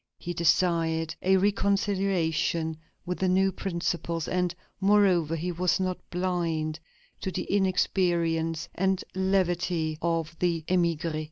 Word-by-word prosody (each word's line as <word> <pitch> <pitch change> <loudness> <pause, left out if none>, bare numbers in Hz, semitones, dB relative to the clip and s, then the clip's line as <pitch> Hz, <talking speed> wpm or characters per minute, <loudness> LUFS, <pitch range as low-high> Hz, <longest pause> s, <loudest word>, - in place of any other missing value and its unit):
He 175 - -5
desired 165 -1 +1
a 190 +1 +4
reconciliation 190 -5 +1 0.3
with 180 0 -3
the 190 - +1
new 190 +1 +3
principles, 170 -3 -2
and, 180 -1 0 0.2
moreover, 190 -5 +3
he 175 +3 -2
was 180 +2 +1
not 185 -1 -1
blind 170 -3 -1 0.4
to - - -3
the 185 -1 -3
inexperience 170 -4 +1
and 190 0 0
levity 175 -4 0
of 165 -1 -1
the 170 -2 0
émigrés. 170 -3 +1
175 Hz, 115 wpm, -27 LUFS, 165-185 Hz, 0.4 s, a